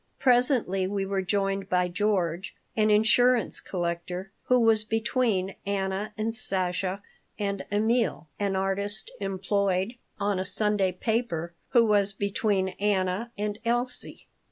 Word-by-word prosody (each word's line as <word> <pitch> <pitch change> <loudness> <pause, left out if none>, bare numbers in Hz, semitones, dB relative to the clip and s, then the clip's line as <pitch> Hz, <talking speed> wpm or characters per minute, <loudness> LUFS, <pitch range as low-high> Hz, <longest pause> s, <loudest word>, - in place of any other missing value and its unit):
Presently 245 -7 +3
we 195 0 -1
were 195 0 -1
joined 195 0 -1
by 180 0 +2
George, 180 -2 -1 0.2
an 215 -1 +3
insurance 230 +3 +4
collector, 180 +1 -4
who 250 -1 +4
was 225 -2 +4
between 220 -3 0
Anna 195 +1 -2
and 220 +1 -1
Sasha, 190 -1 -1 0.3
and 200 -2 -2
Emil, 220 -4 +1
an 200 -2 0
artist 200 - -1
employed 195 +1 0 0.3
on 200 -2 0
a - - 0
Sunday 200 -1 +1
paper, 180 -5 -2
who 235 -2 +4
was 205 -2 +3
between 200 -1 0
Anna 200 +2 0
and 210 0 -2
Elsie. 240 +2 -1
200 Hz, 125 wpm, -27 LUFS, 190-220 Hz, 0.3 s, insurance